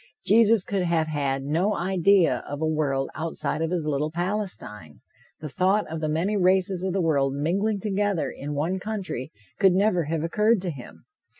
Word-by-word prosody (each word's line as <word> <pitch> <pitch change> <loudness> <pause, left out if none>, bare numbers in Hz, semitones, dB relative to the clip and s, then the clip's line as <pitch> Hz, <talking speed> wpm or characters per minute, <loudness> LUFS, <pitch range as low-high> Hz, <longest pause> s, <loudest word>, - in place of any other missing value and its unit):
Jesus 220 0 +5
could 195 0 -2
have 170 -2 +1
had 140 -3 -1
no 170 +9 0
idea 185 0 +2
of 145 - -5
a 160 - 0
world 145 -4 -1
outside 160 0 -3
of 165 - 0
his 175 -3 -2
little 150 0 -1
Palestine. 170 - -4 0.4
The 155 - -5
thought 190 +7 +1
of 160 -1 -4
the 155 - -1
many 170 +7 0
races 185 -1 +2
of 190 - -1
the 190 0 0
world 140 -4 +1
mingling 195 +8 0
together 205 -3 -1
in 145 +1 -6
one 170 +6 -1
country 195 - -5 0.3
could 190 -2 +5
never 185 -3 +2
have 160 +1 -2
occurred 210 +6 +2
to 180 - -2
him. 130 -5 -12
175 Hz, 180 wpm, -25 LUFS, 150-195 Hz, 0.4 s, Jesus